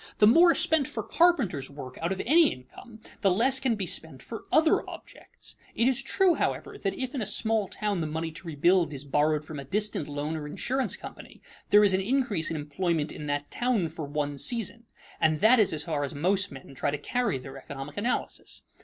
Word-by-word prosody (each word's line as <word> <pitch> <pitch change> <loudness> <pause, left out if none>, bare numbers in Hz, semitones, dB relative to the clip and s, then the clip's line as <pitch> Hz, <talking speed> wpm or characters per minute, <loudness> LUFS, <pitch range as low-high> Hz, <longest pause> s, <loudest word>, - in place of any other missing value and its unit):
The 210 - +6
more 335 +10 +6
spent 320 -4 +4
for 220 - -5
carpenters' 245 - +2
work 135 -3 -9
out 170 +2 -1
of 190 - -2
any 320 +4 +6
income, 220 - -12 0.2
the 195 - +4
less 250 +8 +3
can 255 -4 +1
be 200 -3 -2
spent 160 -5 -7
for 225 - -8
other 315 0 +4
objects. - - -11 0.2
It 235 - +3
is 265 0 +1
true, 365 +7 +3
however, - - -2
that - - -2
if 260 +1 -3
in 265 - -3
a - - -1
small 220 0 0
town 205 -3 -2
the 160 - -2
money 160 +1 -3
to 170 +2 -11
rebuild 165 +1 +2
is 140 +1 -7
borrowed 150 +2 +1
from 155 -2 -7
a - - -6
distant 205 +1 -1
loan 145 +2 -3
or 150 -2 -5
insurance 260 - -1
company, - - -11 0.3
there 210 +1 +7
is 200 -2 +4
an 190 - +2
increase 215 - 0
in 165 - -3
employment 155 +1 -2
in 150 - -7
that 145 0 -3
town 240 -9 0
for 155 -1 -6
one 145 -1 -3
season; 230 - -1 0.3
and 155 -1 +2
that 225 +4 +6
is 210 - +4
as 155 -1 -3
far 150 -3 -2
as 140 +1 -4
most 190 +6 +1
men 135 0 -11
try 135 - -1
to 145 - -2
carry 240 - -1
their 135 +1 -10
economic 140 +1 -8
analysis. 235 +5 -3
185 Hz, 215 wpm, -27 LUFS, 150-235 Hz, 0.3 s, there